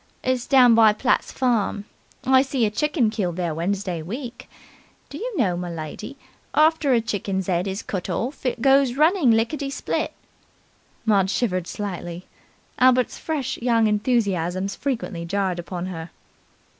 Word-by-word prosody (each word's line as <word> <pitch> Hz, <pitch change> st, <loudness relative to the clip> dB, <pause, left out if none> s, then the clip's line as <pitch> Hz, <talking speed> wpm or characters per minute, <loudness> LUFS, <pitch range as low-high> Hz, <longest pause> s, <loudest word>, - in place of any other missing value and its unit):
It's 255 Hz, -1 st, -1 dB
down 255 Hz, -4 st, +6 dB
by 220 Hz, -2 st, +6 dB
Platt's 255 Hz, +4 st, 0 dB
farm. 225 Hz, -5 st, 0 dB, 0.4 s
I 260 Hz, 0 st, +6 dB
see 265 Hz, -3 st, 0 dB
a 210 Hz, -, 0 dB
chicken 285 Hz, -2 st, +1 dB
killed 190 Hz, -6 st, -2 dB
there 175 Hz, -3 st, -2 dB
Wednesday 180 Hz, +1 st, -2 dB
week. 235 Hz, -, -7 dB, 0.6 s
Do -, -, -7 dB
you 480 Hz, -1 st, -4 dB
know, 195 Hz, -, +2 dB
m'lady, 175 Hz, -, -6 dB, 0.4 s
after 310 Hz, -2 st, +4 dB
a 240 Hz, -2 st, +4 dB
chicken's 195 Hz, -4 st, -3 dB
'ead 180 Hz, 0 st, 0 dB
is 195 Hz, +2 st, -4 dB
cut 190 Hz, -1 st, -4 dB
orf, 240 Hz, -, -3 dB
it 245 Hz, -2 st, -2 dB
goes 270 Hz, -2 st, +4 dB
running 310 Hz, -1 st, +4 dB
licketty 235 Hz, +6 st, +1 dB
split?" -, -, -2 dB, 0.9 s
Maud 200 Hz, -4 st, +3 dB
shivered 185 Hz, -6 st, -1 dB
slightly. 180 Hz, -3 st, -5 dB, 0.5 s
Albert's 255 Hz, -1 st, +3 dB
fresh 275 Hz, -5 st, -3 dB
young 230 Hz, -2 st, +2 dB
enthusiasms 200 Hz, -4 st, 0 dB
frequently 230 Hz, -10 st, -3 dB
jarred 185 Hz, 0 st, -1 dB
upon 175 Hz, +1 st, -5 dB
her. 170 Hz, -2 st, -6 dB
220 Hz, 145 wpm, -23 LUFS, 185-255 Hz, 0.9 s, down